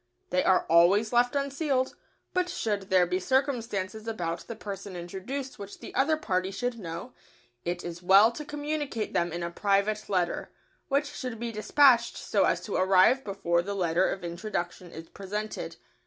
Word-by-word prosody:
They 180 - +2
are 185 - +3
always 190 +7 +4
left 245 +2 +3
unsealed, 275 -1 0 0.4
but 365 -1 +1
should 205 - -2
there 185 -1 +5
be 180 +1 -1
circumstances 225 -4 -1
about 170 -7 -2
the 230 - -5
person 200 -2 -7
introduced 195 +11 -6
which 200 0 -8
the - - -9
other 310 +4 +2
party 185 -10 -1
should 240 +4 -3
know, 170 +6 -7 0.5
it 175 0 -2
is 175 0 -6
well 195 +5 +7
to 300 - -7
communicate 295 -5 -3
them 170 0 +1
in 170 +1 -4
a 170 - -3
private 205 +3 0
letter, 180 -3 -1 0.4
which 280 +1 +1
should 255 -5 -6
be 235 0 -3
despatched 235 +2 +4
so - - +1
as - - +1
to - - -5
arrive 190 +8 +5
before 195 -4 0
the 200 +3 -4
letter 175 -1 +2
of 190 - -4
introduction 175 0 -4
is 165 0 -9
presented. 210 +4 -5
205 Hz, 170 wpm, -28 LUFS, 180-250 Hz, 0.5 s, well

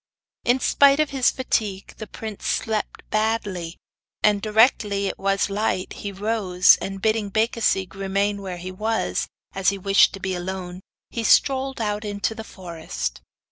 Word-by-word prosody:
In 245 +2 +3
spite 280 +2 +4
of 305 -2 +1
his 265 -3 +3
fatigue, 210 -6 -2
the 215 - -7
prince 215 0 -7
slept 220 -1 -2
badly, 210 -6 -1 0.5
and 205 -1 +4
directly 210 -2 +3
it - - -3
was 195 0 +1
light 200 -2 -1
he 200 - -6
rose, 195 -3 +3
and 195 0 -4
bidding 215 0 0
Becasigue 215 -4 +1
remain 200 +1 -1
where 185 -2 -5
he 180 +2 -6
was, 220 +4 -1 0.3
as 195 -1 +2
he 200 - -2
wished 195 +1 +4
to 195 - -7
be 190 0 -2
alone, 180 0 -5 0.3
he 230 - -3
strolled 270 +3 +3
out 210 -1 -2
into 205 +1 -2
the 220 0 -7
forest. 160 - -6
205 Hz, 155 wpm, -23 LUFS, 190-220 Hz, 0.5 s, spite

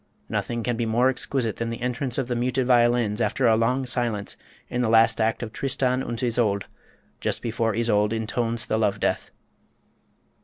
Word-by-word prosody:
Nothing 120 -1 -2
can 120 0 0
be 115 -1 -1
more 120 +4 +3
exquisite 130 -3 -1
than 115 0 -2
the 115 - -5
entrance 125 0 -2
of 135 -3 -1
the 125 - -1
muted 125 +2 0
violins 120 -3 +3
after 130 - +1
a 115 -2 +5
long 125 +4 +1
silence, 120 -5 -1 0.3
in 125 0 -2
the 120 - +1
last 115 0 +4
act 110 +2 0
of 110 -2 -6
"Tristan 130 -1 0
und 120 -1 -4
Isolde," 115 -5 +1 0.5
just - - -2
before 115 -2 -1
Isolde 110 -2 +2
intones 115 +2 -1
the 110 - 0
Love 105 -3 +1
Death. - - -1
120 Hz, 180 wpm, -25 LUFS, 110-125 Hz, 0.5 s, a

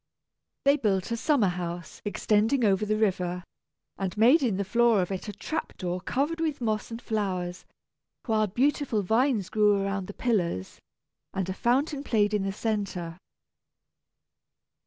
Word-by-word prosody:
They 280 +1 +5
built 195 -5 0
a - - +1
summer 255 -4 +2
house 175 -1 -5
extending 220 +4 +2
over 200 +1 +2
the 215 +1 +1
river, 180 -4 0 0.6
and 190 0 -3
made 245 +9 +6
in 225 -8 +1
the 200 - -1
floor 235 +1 +3
of 180 0 -1
it 190 +3 -4
a - - -2
trap 310 +11 -5
door 180 0 -3
covered 290 - -1
with 310 -3 -1
moss 215 -3 -1
and 230 0 -6
flowers, 190 -6 -3 0.6
while 215 -2 +2
beautiful 245 0 +1
vines 225 0 +1
grew 210 -2 +3
around 195 -1 -2
the 205 - -8
pillars, 175 - -1 0.6
and 190 -2 -1
a - - -1
fountain 275 - 0
played 210 -5 +1
in 210 - +2
the 195 0 -1
centre. 195 -5 -3
210 Hz, 155 wpm, -27 LUFS, 190-235 Hz, 0.6 s, made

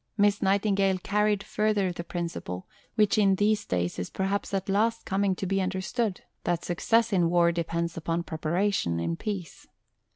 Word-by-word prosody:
Miss 205 0 +3
Nightingale 195 -1 +2
carried 210 +2 +1
further 210 -3 +1
the 170 0 -6
principle, 170 - -5 0.3
which 215 -1 +3
in 195 -2 +4
these 210 +1 +1
days 90 -1 -1
is 90 - -3
perhaps 195 +1 -2
at 195 0 -2
last 225 +4 +1
coming 195 0 +1
to 190 - -4
be 195 +1 +1
understood, 190 +3 -1 0.2
that 175 -1 -1
success 225 +6 +2
in 175 -3 +3
war 170 0 +4
depends 170 0 -2
upon 165 +1 -1
preparation 160 - 0
in 85 0 -1
peace. 190 - -5
190 Hz, 160 wpm, -27 LUFS, 170-205 Hz, 0.3 s, in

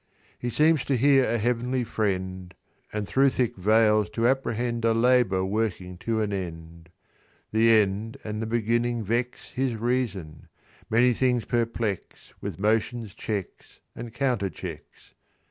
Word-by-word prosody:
"He 120 - -3
seems 150 +4 +3
to 135 - +1
hear 135 +1 +5
a 120 - 0
Heavenly 125 +2 0
Friend, 95 -4 -2 0.4
And 105 -1 -3
thro' 135 +4 +4
thick 125 -3 -1
veils 105 +2 +3
to 115 0 +2
apprehend 120 -2 -1
A 115 -1 +3
labour 115 -6 +3
working 95 -3 -2
to 110 +1 -1
an 105 -1 -1
end. 85 -3 -7 0.6
"The 110 +1 +4
end 110 0 +2
and 105 0 -4
the 110 - -3
beginning 120 +1 0
vex 120 +4 -2
His 130 -2 -1
reason: 105 - -2 0.4
many 120 +3 +4
things 125 -1 +1
perplex, 115 -4 -3
With - - -5
motions, 110 +1 0
checks, 100 -5 -6 0.2
and 115 0 -7
counterchecks. 120 - -4
115 Hz, 135 wpm, -26 LUFS, 100-120 Hz, 0.6 s, hear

